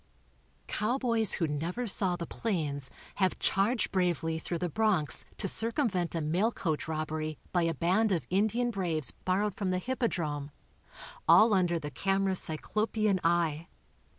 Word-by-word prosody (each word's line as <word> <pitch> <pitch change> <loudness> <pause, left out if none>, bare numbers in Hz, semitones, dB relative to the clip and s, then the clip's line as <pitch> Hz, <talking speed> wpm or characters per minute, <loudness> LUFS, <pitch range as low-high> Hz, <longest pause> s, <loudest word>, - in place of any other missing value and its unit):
Cowboys 230 -1 0
who 165 - 0
never 165 +11 -3
saw 190 -4 +2
the 170 -1 -5
plains 150 - -3 0.3
have 190 -2 +1
charged 215 +5 +1
bravely 170 -3 0
through 170 +1 -4
the 180 - -2
Bronx 190 -4 +3
to 200 - -1
circumvent 220 - +1
a 165 - -1
mail 175 +9 +1
coach 160 -9 -2
robbery 155 -1 -3
by 175 - +2
a 165 -1 0
band 190 +8 +2
of 175 -4 0
Indian 220 +5 +1
braves 170 - 0
borrowed 200 +2 -1
from 195 -1 -3
the 185 - +1
Hippodrome, 170 - -2 0.8
all 220 0 +7
un 185 -2 +3
der 170 0 0
the 150 -2 -6
camera's 195 +4 +1
cyclopean 210 +5 0
eye. 165 -1 +1
185 Hz, 150 wpm, -30 LUFS, 160-215 Hz, 0.8 s, all